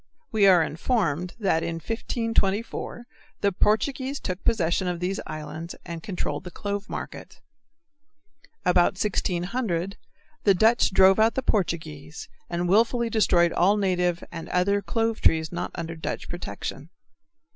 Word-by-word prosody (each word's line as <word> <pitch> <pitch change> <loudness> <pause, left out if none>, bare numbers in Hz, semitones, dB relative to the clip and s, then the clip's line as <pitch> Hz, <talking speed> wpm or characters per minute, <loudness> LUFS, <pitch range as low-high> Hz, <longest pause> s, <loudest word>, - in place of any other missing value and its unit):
We 210 -3 +4
are 180 -3 +7
informed 170 - -1
that 190 -6 +2
in 170 - -2
1524 225 +3 -2 0.4
the 200 - +3
Portuguese 260 +8 0
took 185 0 -4
possession 185 -4 +1
of 175 -1 -2
these 185 +2 -2
islands 155 +2 -6
and 170 -2 -6
controlled 185 -1 -3
the 180 - -7
clove 205 +3 -4
market. - - -7 1.3
About 180 -1 +4
1600 190 0 -1 0.5
the 200 -2 +5
Dutch 225 +6 +4
drove 190 +1 +5
out 225 +1 +4
the 265 - -1
Portuguese 160 - -2 0.2
and 175 0 -1
willfully 230 +4 +3
destroyed 175 -6 +3
all 200 +4 +3
native 180 -3 +1
and 165 -1 -7
other 200 +3 +2
clove 225 +1 -1
trees 160 -1 +3
not 175 0 -3
under 165 0 -5
Dutch 160 - -5
protection. 140 - -6
185 Hz, 135 wpm, -25 LUFS, 170-215 Hz, 1.3 s, are